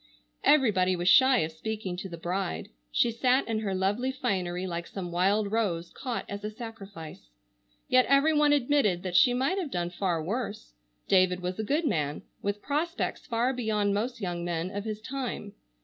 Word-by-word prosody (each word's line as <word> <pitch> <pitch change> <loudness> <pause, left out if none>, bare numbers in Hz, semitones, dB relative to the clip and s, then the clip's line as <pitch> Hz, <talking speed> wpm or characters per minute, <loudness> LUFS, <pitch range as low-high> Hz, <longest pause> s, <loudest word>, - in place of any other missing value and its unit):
Everybody 205 -11 +4
was 175 0 -2
shy 260 +5 +6
of 155 - -2
speaking 200 +2 -4
to 190 +1 -6
the 170 - -7
bride. 170 - -3 0.2
She 235 - +3
sat 250 +3 +2
in 225 -1 0
her 200 -3 -2
lovely 205 +8 0
finery 185 -9 -2
like 170 -2 -4
some 180 -3 -6
wild 200 +4 +2
rose 180 -7 -1
caught 250 -3 -4
as 200 0 -6
a 210 - -2
sacrifice. 200 - -9 0.6
Yet 255 0 +4
every 275 +3 +4
one 295 -1 +4
admitted 250 -10 +2
that 180 -2 -4
she 245 +5 +6
might 275 +10 +1
have 340 -6 -3
done 175 -5 -2
far 175 -3 -1
worse. 210 - -4 0.3
David 185 -1 +3
was 180 +2 -4
a - - 0
good 295 +9 0
man, 150 - -1 0.2
with 205 +1 -3
prospects 320 +5 -2
far 240 +3 +1
beyond 215 -5 0
most 230 +5 -2
young 175 -4 -3
men 175 +1 -2
of 205 +1 -4
his 215 -1 -4
time. 245 -5 -5
205 Hz, 180 wpm, -28 LUFS, 180-250 Hz, 0.6 s, shy